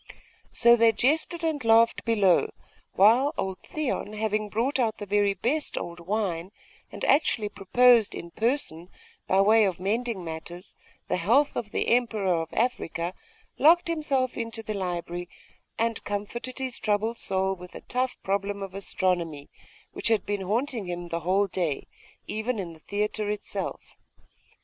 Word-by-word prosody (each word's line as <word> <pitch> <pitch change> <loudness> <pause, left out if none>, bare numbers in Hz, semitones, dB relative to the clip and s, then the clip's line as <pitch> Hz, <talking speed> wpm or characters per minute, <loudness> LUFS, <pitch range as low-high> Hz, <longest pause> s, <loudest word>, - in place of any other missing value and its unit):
So 235 0 +6
they 230 -1 +5
jested 320 +8 +1
and 310 -5 -1
laughed 230 +1 +4
below, 205 -6 +3 0.4
while 245 +9 +5
old 190 -1 -3
Theon, 285 -8 -3
having 215 0 -1
brought 245 +7 0
out 225 -3 +1
the 205 - -6
very 205 0 +2
best 290 +8 -1
old 170 0 -5
wine, 185 -1 -2 0.4
and - - -5
actually 235 -7 +2
proposed 235 +3 +4
in 170 - -8
person, 220 - -1 0.4
by 190 +1 +4
way 215 +2 +5
of 190 -4 0
mending 220 +1 -1
matters, 170 +3 -8 0.3
the - - 0
health 235 - +3
of 215 - -3
the - - -1
Emperor 220 -6 +2
of 165 - -6
Africa, 180 -7 -1 0.5
locked 335 +3 +5
himself 280 -6 0
into 230 -1 -4
the 215 - -4
library, 175 -2 -4 0.5
and 230 0 -1
comforted 210 +5 -5
his 260 -2 -4
troubled 215 +2 0
soul 190 0 0
with 180 -1 -12
a - - -8
tough 255 0 -2
problem 200 +1 -1
of 195 -1 -7
astronomy, 175 -6 -1 0.4
which - - -1
had 225 -2 +2
been 205 -1 -2
haunting 225 +2 -1
him 175 0 -5
the 170 - -2
whole 185 +5 +2
day, 175 -6 -2 0.4
even 220 +3 -2
in 180 -4 -5
the 160 - -16
theatre 210 +3 -2
itself. 210 0 -4
210 Hz, 155 wpm, -27 LUFS, 185-235 Hz, 0.5 s, So